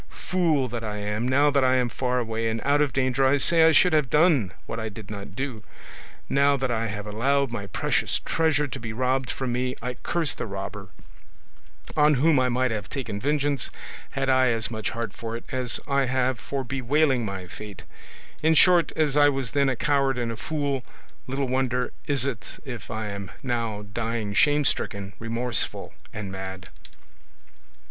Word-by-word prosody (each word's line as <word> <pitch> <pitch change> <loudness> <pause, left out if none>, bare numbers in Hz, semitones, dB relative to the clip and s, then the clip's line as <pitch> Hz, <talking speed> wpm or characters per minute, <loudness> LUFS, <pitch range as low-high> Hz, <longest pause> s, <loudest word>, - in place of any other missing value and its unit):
Fool 165 -8 +2
that 115 0 -4
I 105 -1 -3
am! 105 +3 -2
now 140 +3 +4
that 140 -1 +3
I 130 0 +4
am 125 -1 +2
far 125 +1 -1
away, 115 -1 -1
and 110 0 -2
out 145 +1 +3
of 145 -3 +2
danger, 130 +1 +1
I 135 +2 +4
say 165 +4 +4
I - - +6
should 180 +1 +5
have 150 -5 +3
done 150 - +4
what 115 - -5
I 110 0 -3
did 105 0 -10
not 100 -1 -7
do: 130 -5 -4 0.7
now 140 +1 +3
that 130 -1 -1
I 115 0 0
have 105 -1 -5
allowed 135 +5 +1
my 100 -4 -4
precious - - 0
treasure 155 -3 +1
to - - -6
be 115 -1 -5
robbed 130 +1 0
from 130 -2 -2
me, 125 +1 -1
I 125 +2 -3
curse 165 +3 -1
the - - -5
robber, 100 0 -6 1.1
on 150 0 +5
whom 145 +2 +4
I 130 0 +2
might 125 0 +1
have 105 -2 -4
taken 115 -7 -4
vengeance 145 -1 0 0.4
had 135 0 -2
I 130 -1 +4
as 115 -1 0
much 110 -2 -2
heart 115 -4 -4
for 115 +1 -5
it - - -11
as 130 -2 -1
I 140 -1 +2
have 130 -1 0
for 135 +6 -3
bewailing 135 +1 +1
my 95 -3 -4
fate; 100 0 -10 0.6
in 160 +1 +4
short, 170 0 +5
as 150 -3 +1
I 145 0 +6
was 135 -4 -2
then 140 -1 +2
a 130 - 0
coward 140 -1 +1
and 120 -2 -1
a - - -4
fool, 140 0 -2 0.4
little 135 +1 -1
wonder 125 -1 0
is 140 -3 +1
it 125 -5 -5
if 120 -5 -7
I 110 -1 -3
am 100 -1 -6
now 115 -5 -2
dying 115 -2 -2
shame 145 +6 +4
stricken, 100 -5 -1
remorseful, 115 +1 -1 0.2
and 105 -3 -6
mad. 95 -1 -7
125 Hz, 190 wpm, -25 LUFS, 110-140 Hz, 1.1 s, I